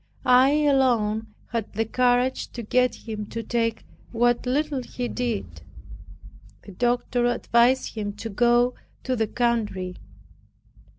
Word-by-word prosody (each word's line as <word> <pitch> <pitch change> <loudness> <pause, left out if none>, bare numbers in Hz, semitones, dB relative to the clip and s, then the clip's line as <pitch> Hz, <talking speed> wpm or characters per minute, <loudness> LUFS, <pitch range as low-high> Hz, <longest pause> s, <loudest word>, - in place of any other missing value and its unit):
I 255 +3 +6
alone 225 -6 +1 0.2
had 230 -2 -3
the 225 +2 0
courage 250 +2 +1
to 235 - -6
get 250 +3 0
him 210 -2 -5
to 230 +1 -5
take 230 0 -1 0.3
what 240 +1 +1
little 285 +1 0
he 245 0 -5
did. 240 -4 -4 1.0
The 200 - -11
doctor 240 +3 0
advised 245 +1 +2
him 205 -2 -4
to 225 +2 -7
go 240 +3 +3 0.3
to 260 - -1
the 220 -2 0
country. 210 -7 -1
240 Hz, 125 wpm, -24 LUFS, 220-250 Hz, 1.0 s, I